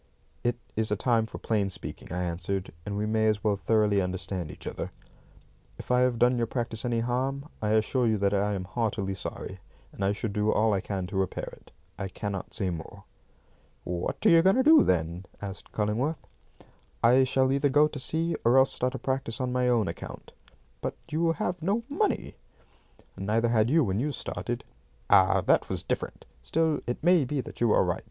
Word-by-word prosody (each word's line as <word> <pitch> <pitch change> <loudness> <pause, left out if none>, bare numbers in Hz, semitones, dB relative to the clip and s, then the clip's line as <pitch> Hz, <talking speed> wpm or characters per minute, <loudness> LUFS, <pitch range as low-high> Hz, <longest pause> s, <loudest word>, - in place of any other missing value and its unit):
"It 120 0 +1 0.2
is 110 0 0
a 105 - +1
time 115 +1 +1
for - - -8
plain 105 -3 0
speaking," 95 - -6
I 90 0 -1
answered, 90 +2 -3
"and 100 0 -2
we 105 - 0
may 110 0 +2
as 105 -1 +1
well 105 -2 +2
thoroughly 105 -1 +2
understand 90 -2 -3
each 75 - -11
other. - - -4 0.9
If - - -6
I 125 - +4
have 125 -1 +2
done 120 +1 +3
your 115 - +1
practice 115 -2 -3
any 120 -2 0
harm, 135 +4 -1
I 105 0 +1
assure 115 +3 +2
you 110 -1 +2
that 100 0 +1
I 100 +1 +1
am 95 - -3
heartily 105 -1 -2
sorry, 95 0 -6 0.3
and 100 - -5
I 95 - +3
shall 105 +1 -3
do 105 +1 +1
all 110 0 +3
I 95 - 0
can 95 -2 -3
to 95 - -7
repair 95 -1 -2
it. - - -21 0.3
I 100 - -2
cannot 100 0 -5
say 95 -3 -1
more." 85 +4 -8 0.8
"What 90 -1 -3
are - - +8
you 165 -1 +7
going 190 +4 +4
to 260 - +3
do, 315 +2 +8
then?" 85 +1 0
asked 100 -1 -8
Cullingworth. 115 +9 -1 0.8
"I 125 +3 +6
shall 130 0 +2
either 140 +1 +2
go 150 +2 +5
to 150 -1 -7
sea 165 +5 -1
or 120 +3 +5
else 130 0 +5
start 125 +1 -1
a - - -2
practice 130 -4 -3
on 130 -1 -1
my 125 0 +2
own 115 -4 +2
account." 85 - -8 0.5
"But - - -3 0.2
you 165 +2 +2
have 175 +2 -3
no 200 +8 0
money." 370 +9 -1 0.8
"Neither 110 +4 +1
had 115 -1 +3
you 160 +3 +4
when 100 -3 0
you 145 +5 0
started." 135 - -4 0.5
"Ah, - - +6
that - - +2
was - - -2
different. - - -4 0.2
Still, 160 - +1
it 120 - -3
may 175 -2 +5
be 140 +2 -2
that - - -11
you 120 -2 +4
are - - +5
right. - - -1
110 Hz, 205 wpm, -28 LUFS, 100-130 Hz, 0.9 s, are